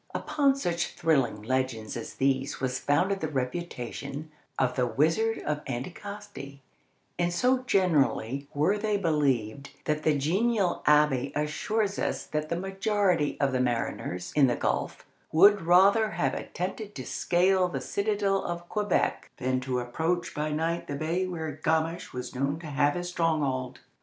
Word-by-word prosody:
Upon 280 Hz, -2 st, +2 dB
such 175 Hz, -11 st, -2 dB
thrilling 145 Hz, -10 st, +1 dB
legends 130 Hz, -2 st, -1 dB
as -, -, -6 dB
these 135 Hz, +1 st, 0 dB
was 130 Hz, -1 st, -1 dB
founded 190 Hz, +7 st, +1 dB
the 160 Hz, -, -2 dB
reputation 145 Hz, +1 st, -4 dB, 0.3 s
of 130 Hz, -2 st, +1 dB
the 125 Hz, -2 st, +1 dB
"Wizard 165 Hz, -, +1 dB
of 150 Hz, 0 st, -2 dB
Anticosti," 165 Hz, +2 st, -7 dB, 0.6 s
and 175 Hz, 0 st, +2 dB
so 250 Hz, +8 st, +2 dB
generally 140 Hz, -, +1 dB
were 170 Hz, +9 st, +1 dB
they 210 Hz, -1 st, 0 dB
believed 140 Hz, -, 0 dB, 0.2 s
that 150 Hz, 0 st, 0 dB
the 155 Hz, -1 st, +2 dB
genial 190 Hz, +6 st, +1 dB
abbé 150 Hz, -3 st, +4 dB
assures 195 Hz, +8 st, -1 dB
us -, -, -2 dB
that 155 Hz, 0 st, -3 dB
the 170 Hz, -, 0 dB
majority 195 Hz, -3 st, 0 dB
of 140 Hz, -1 st, +2 dB
the 130 Hz, -, 0 dB
mariners 115 Hz, -7 st, -2 dB
in 145 Hz, -3 st, +6 dB
the 120 Hz, -, +1 dB
gulf -, -, -2 dB, 0.3 s
would 200 Hz, +6 st, +6 dB
rather 195 Hz, +6 st, +5 dB
have 135 Hz, -10 st, -1 dB
attempted 200 Hz, +4 st, -5 dB
to -, -, -6 dB
scale 185 Hz, +1 st, +2 dB
the 175 Hz, -, -3 dB
citadel 200 Hz, -1 st, 0 dB
of 175 Hz, 0 st, -5 dB
Quebec 210 Hz, -3 st, 0 dB
than 130 Hz, 0 st, 0 dB
to 130 Hz, -1 st, -2 dB
approach 160 Hz, +8 st, -2 dB
by 150 Hz, +1 st, -2 dB
night 165 Hz, +3 st, -1 dB
the 140 Hz, -, -3 dB
bay 165 Hz, +5 st, -1 dB
where 160 Hz, -4 st, -5 dB
Gamache 160 Hz, +1 st, 0 dB
was 125 Hz, 0 st, -6 dB
known 140 Hz, +3 st, -1 dB
to -, -, -10 dB
have 145 Hz, 0 st, +1 dB
his 175 Hz, 0 st, -3 dB
stronghold. 145 Hz, -7 st, -1 dB
155 Hz, 150 wpm, -28 LUFS, 135-185 Hz, 0.6 s, in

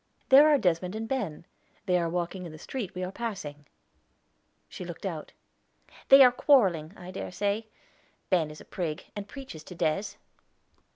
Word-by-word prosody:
"There 285 Hz, +3 st, +8 dB
are 295 Hz, -, +5 dB
Desmond 180 Hz, -2 st, 0 dB
and 225 Hz, +1 st, -4 dB
Ben; 205 Hz, -, -3 dB, 0.4 s
they 180 Hz, -2 st, +2 dB
are 170 Hz, -1 st, -1 dB
walking 175 Hz, +2 st, -3 dB
in -, -, -10 dB
the 155 Hz, -, -10 dB
street 215 Hz, -, -6 dB
we 185 Hz, -, -3 dB
are 180 Hz, -, -4 dB
passing." 180 Hz, -11 st, -6 dB, 1.0 s
She -, -, -8 dB
looked -, -, -8 dB
out. -, -, -5 dB, 0.8 s
"They 275 Hz, 0 st, +10 dB
are 250 Hz, -, +7 dB
quarreling, 195 Hz, -, +3 dB
I 180 Hz, 0 st, -9 dB
dare 185 Hz, -, -6 dB
say. 205 Hz, +4 st, -1 dB, 0.6 s
Ben 165 Hz, -5 st, +3 dB
is 150 Hz, -, -10 dB
a -, -, -13 dB
prig, 170 Hz, -2 st, -4 dB
and 205 Hz, -1 st, -6 dB
preaches 255 Hz, -, -9 dB
to 180 Hz, -, -10 dB
Des." 170 Hz, +5 st, -1 dB
185 Hz, 170 wpm, -28 LUFS, 165-225 Hz, 1.0 s, They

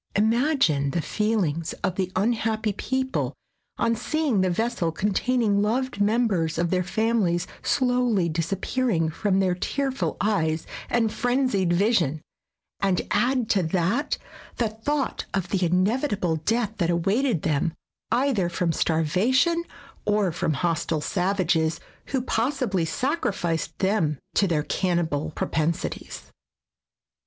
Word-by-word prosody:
Imagine 220 Hz, -, +2 dB
the 170 Hz, +4 st, -1 dB
feelings 190 Hz, -8 st, 0 dB
of 190 Hz, -, +1 dB
the 185 Hz, 0 st, -2 dB
unhappy 220 Hz, +1 st, 0 dB
people 260 Hz, +5 st, -2 dB, 0.4 s
on 230 Hz, -, +2 dB
seeing 275 Hz, -2 st, 0 dB
the 185 Hz, -, +2 dB
vessel 200 Hz, -3 st, 0 dB
containing 210 Hz, +3 st, +1 dB
loved 235 Hz, +1 st, -1 dB
mem 225 Hz, +4 st, +3 dB
bers 165 Hz, -6 st, -1 dB
of 170 Hz, 0 st, 0 dB
their 185 Hz, -1 st, +2 dB
families 190 Hz, -3 st, +1 dB, 0.2 s
slowly 245 Hz, -8 st, +2 dB
disappearing 170 Hz, +3 st, 0 dB
from 195 Hz, +3 st, +1 dB
their 185 Hz, -2 st, +2 dB
tearful 270 Hz, +8 st, -2 dB
eyes 160 Hz, -7 st, 0 dB, 0.2 s
and 225 Hz, -3 st, +1 dB
frenzied 245 Hz, -8 st, +1 dB
vision, 175 Hz, -, +2 dB, 0.6 s
and 195 Hz, -2 st, +1 dB
add 245 Hz, +2 st, +2 dB
to 195 Hz, -, +3 dB
that 180 Hz, -, 0 dB, 0.4 s
the 230 Hz, -3 st, +1 dB
thought 265 Hz, +6 st, -2 dB
of 190 Hz, -2 st, -1 dB
the 195 Hz, -, 0 dB
inevi 190 Hz, -, +2 dB
table 180 Hz, -6 st, 0 dB
death 215 Hz, +6 st, 0 dB
that 175 Hz, -4 st, 0 dB
awaited 195 Hz, -, +1 dB
them 155 Hz, +2 st, 0 dB, 0.4 s
either 240 Hz, -8 st, +2 dB
from 175 Hz, -1 st, 0 dB
starvation 215 Hz, -, +2 dB, 0.4 s
or 205 Hz, -3 st, +2 dB
from 160 Hz, -1 st, -1 dB
hostile 165 Hz, 0 st, 0 dB
savages, 175 Hz, -4 st, +1 dB, 0.3 s
who 265 Hz, -3 st, -1 dB
possibly 235 Hz, -, 0 dB
sacrificed 185 Hz, -, -1 dB
them 190 Hz, -7 st, +1 dB, 0.2 s
to 200 Hz, -, +3 dB
their 155 Hz, -4 st, +1 dB
cannibal 160 Hz, -4 st, 0 dB
propensities. 160 Hz, +1 st, -2 dB
195 Hz, 125 wpm, -25 LUFS, 170-235 Hz, 0.6 s, mem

